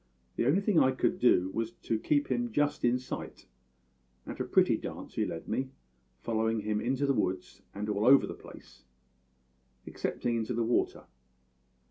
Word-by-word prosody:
The 115 - 0
only 165 +9 +3
thing 200 -4 +3
I 130 - +4
could 180 +7 0
do 95 -6 +3
was 115 0 -2
to 115 - -1
keep 145 +3 +1
him 120 -1 0
just 145 +4 0
in 120 +1 +3
sight, 125 - -7 0.8
and - - -7
a - - -1
pretty - - +3
dance - - -7
he - - -1
led - - -6
me, 130 0 -2 0.5
following 110 -1 0
him 105 0 -1
into 135 +4 0
the 140 - +2
woods 95 -6 -2
and 105 +1 -4
all 105 +2 0
over 135 +1 +7
the - - -6
place - - -14 1.0
excepting 120 -1 -2
into 115 +1 -2
the 120 - +1
water. 120 - 0
120 Hz, 170 wpm, -30 LUFS, 110-135 Hz, 1.0 s, over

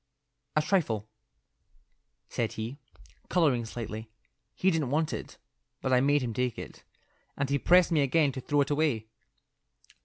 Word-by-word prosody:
"A 155 - +3
trifle," 130 - 0 1.2
said 115 -2 -2
he, 115 +6 -5 0.5
colouring 145 -10 +2
slightly. 110 -1 -6 0.5
"He 190 - +3
didn't 155 -6 0
want 155 +3 +1
it, - - -6 0.4
but 130 - 0
I 125 - +5
made 145 0 +3
him 120 -2 -2
take 125 0 -1
it. - - -8 0.6
And 140 -1 -1
he 140 - +2
pressed 180 +3 +5
me 155 -3 +4
again 140 +1 +3
to 130 - -6
throw 145 +3 +2
it 140 - 0
away." 145 -8 +1
140 Hz, 150 wpm, -29 LUFS, 120-155 Hz, 1.2 s, I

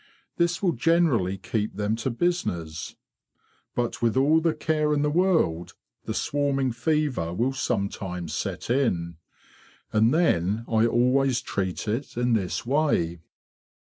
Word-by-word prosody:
This 175 +2 +1
will 180 - +3
generally 130 - +2
keep 105 +2 -3
them 105 +2 0
to 115 +3 -2
business; 90 - -2 0.8
but 120 -1 -2
with 115 +1 +1
all 150 +4 +4
the 165 -1 +1
care 150 -1 +1
in 145 - +1
the 150 - +1
world 160 - +1 0.3
the - - -3
swarming 140 -2 0
fever 130 - 0
will 125 +7 0
sometimes 100 -9 -3
set - - -3
in. 85 - 0 0.8
And 110 +2 +4
then 110 - +1
I 115 0 +3
always 125 +2 +2
treat 95 -4 -3
it 115 +4 -3
in 120 0 +1
this 100 -3 -1
way." 120 - +1
120 Hz, 135 wpm, -25 LUFS, 100-150 Hz, 0.8 s, all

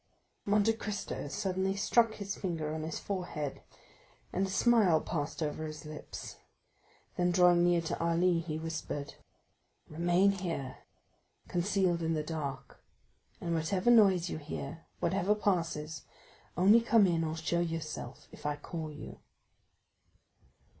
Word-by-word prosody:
Monte 210 +2 +3
Cristo 210 -8 -4
suddenly 190 +2 -1
struck 225 +2 +3
his 200 -1 -4
finger 160 -5 -3
on 160 - -3
his 160 0 -4
forehead 175 -7 -4 0.7
and 190 +2 +1
a - - -7
smile 200 -5 +4
passed 155 0 -3
over 150 +1 -3
his 155 0 -8
lips; 150 0 -8 0.8
then 175 0 +2
drawing 175 -1 +5
near 175 -1 +4
to 165 - -3
Ali, 170 +1 +3
he 160 -2 -4
whispered: 160 -3 -4 0.7
"Remain 175 +5 +3
here, 170 -9 -4 0.7
concealed 180 -1 +1
in 165 0 0
the 155 - -1
dark, 140 -5 -5 0.6
and 170 -1 -2
whatever 185 +7 +2
noise 195 -6 +5
you 160 - -4
hear, 160 +2 -7
whatever 195 +2 +2
passes, 165 -6 -1 0.6
only 205 +6 +6
come 230 -2 +5
in 170 -3 +1
or 160 0 -2
show 160 +2 0
yourself 160 -6 -4
if - - -13
I 150 0 0
call 155 +1 -6
you." 150 - -9
170 Hz, 135 wpm, -32 LUFS, 155-195 Hz, 0.8 s, only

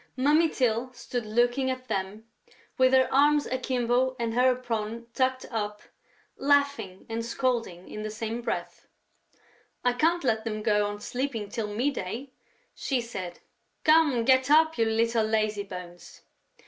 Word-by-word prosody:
Mummy 300 +5 +4
Tyl 250 -1 0
stood 245 -2 -5
looking 240 +4 +2
at 255 0 -4
them, 205 +1 -3 0.5
with 260 -1 +4
her 260 -1 +5
arms 290 +2 +4
akimbo 255 0 0
and 230 -1 -2
her 250 +1 +3
apron 230 -2 -4
tucked 260 0 0
up, 210 -2 -3 0.5
laughing 280 -9 +1
and 230 0 -3
scolding 230 -7 -2
in 215 - -7
the 215 - -4
same 225 +2 -4
breath: - - -4 1.0
"I 245 - +4
can't 330 +6 +1
let 220 -4 +1
them 215 -2 -4
go 210 -1 +2
on 205 0 -6
sleeping 245 -4 -3
till 220 0 -3
mid 240 +8 -1
day," 240 +7 -5 0.4
she 265 -3 -1
said. 190 -7 -6 0.4
"Come, 310 -7 +4
get 260 +1 +4
up, 315 +2 +5
you 225 - +2
little 225 +1 +1
lazybones!" 200 -5 -3
235 Hz, 145 wpm, -27 LUFS, 215-260 Hz, 1.0 s, her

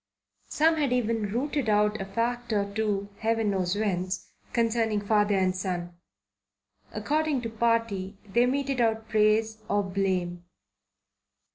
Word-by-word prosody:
Some 320 +1 +3
had 285 -4 +1
even 225 -4 0
routed 270 +1 -1
out 210 0 +2
a - - -3
fact 240 +4 -2
or 200 -1 0
two, 205 -2 -1
Heaven 225 -1 +1
knows 185 -1 0
whence, 190 -3 -2 0.2
concerning 230 -2 +1
father 205 0 +2
and 185 -1 +2
son. 180 -2 -3 1.0
According 300 -3 0
to 230 - -3
party 225 -4 0
they 235 +5 +3
meted 275 -1 0
out 225 -1 0
praise 220 0 +2
or 205 0 +2
blame. 185 -2 -1
215 Hz, 130 wpm, -27 LUFS, 195-235 Hz, 1.0 s, Some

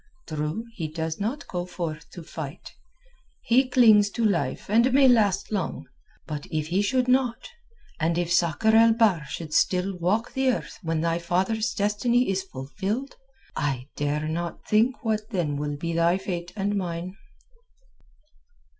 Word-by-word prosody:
True, 155 +8 -3
he 170 -8 -4
does 160 +1 -4
not 230 +8 -3
go 175 -1 -3
forth 170 -3 -6
to 175 - -8
fight. 155 -1 -8 0.7
He 255 +2 +3
clings 220 -5 +6
to 235 - 0
life 165 -11 0
and 235 +5 +3
may 270 0 +6
last 210 -6 +3
long. 200 -5 -2 0.4
But 150 -1 -6
if 155 0 -2
he 185 +3 +2
should 250 +5 +1
not, 255 - +1 0.5
and 165 +1 +1
if 175 0 0
Sakr 175 +7 +3
el 225 0 +7
Bahr 210 -9 +2
should 155 +2 -6
still 185 +3 +2
walk 190 +7 0
the 265 0 0
earth - - -6
when 165 -3 -1
thy 165 0 0
father's 190 +7 0
destiny 220 +3 +1
is 190 0 0
fulfilled, 190 - -5 0.4
I 135 -2 -2
dare 145 +1 -1
not 170 +2 -4
think 235 +4 +2
what 215 -1 -1
then 170 -9 -1
will 145 0 -3
be 170 +3 -3
thy 170 +2 +3
fate 175 -2 -5
and 205 0 -1
mine." 180 -1 -4
185 Hz, 155 wpm, -25 LUFS, 160-220 Hz, 0.7 s, el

